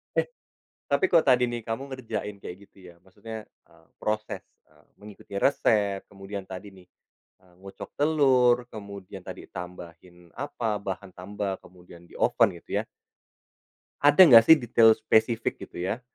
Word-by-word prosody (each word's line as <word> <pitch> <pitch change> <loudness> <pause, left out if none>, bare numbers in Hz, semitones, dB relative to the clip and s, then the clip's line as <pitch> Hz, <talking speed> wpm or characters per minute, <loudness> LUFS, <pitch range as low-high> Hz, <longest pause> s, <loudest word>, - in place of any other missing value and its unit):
Eh, - - +1 0.6
tapi 385 - +2
kalo 265 - +4
tadi 125 -4 +3
nih, 120 -1 -4
kamu 115 +5 -5
ngerjain 115 -4 -5
kayak 90 - -7
gitu, - - -31
ya. 85 - -22
Maksudnya, 105 +3 -9
eee, 80 0 -27 0.2
proses, 105 0 -3 0.3
eee, - - -26
mengikuti 100 -1 -10
resep, 100 -6 +1
kemudian 100 0 -7
tadi 95 +1 -9
nih, 90 -1 -18 0.5
eee, 90 -1 -25
ngocok 95 0 -10
telur, 135 -5 +3 0.2
kemudian 100 -3 -9
tadi - - -9
tambahin 90 -1 -11
apa, 115 -6 -3
bahan 95 -1 -6
tambah, 95 +1 -5
kemudian 90 -1 -17
dioven, - - +2
gitu - - -3
ya. - - -9 1.2
Ada 145 +5 +4
nggak 115 -8 +9
sih 160 - +10
detail 115 -3 +4
spesifik, 110 +1 +1
gitu - - -15
ya, 95 +7 -3
105 Hz, 145 wpm, -26 LUFS, 95-120 Hz, 1.2 s, sih